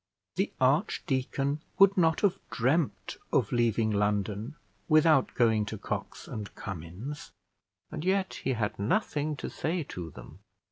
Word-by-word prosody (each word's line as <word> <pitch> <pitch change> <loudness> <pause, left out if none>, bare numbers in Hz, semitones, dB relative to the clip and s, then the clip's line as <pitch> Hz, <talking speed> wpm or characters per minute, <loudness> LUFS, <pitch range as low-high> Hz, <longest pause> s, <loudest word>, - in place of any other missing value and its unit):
The - - 0
archdeacon 135 +2 +1 0.2
would 195 0 +7
not 165 -3 +3
have 195 -2 +2
dreamt 135 +6 0
of - - +2
leaving 115 -2 +2
London 105 +4 0 0.3
without 155 -3 +5
going 110 -3 +3
to 110 - -4
Cox - - -5
and 105 -2 -6
Cummins; 95 - -7 0.6
and - - -5
yet 190 +1 0
he 130 - +1
had 110 -4 -2
nothing 150 - 0
to - - -5
say 165 +1 -2
to 90 - -7
them. 70 +4 -12
125 Hz, 135 wpm, -29 LUFS, 105-155 Hz, 0.6 s, would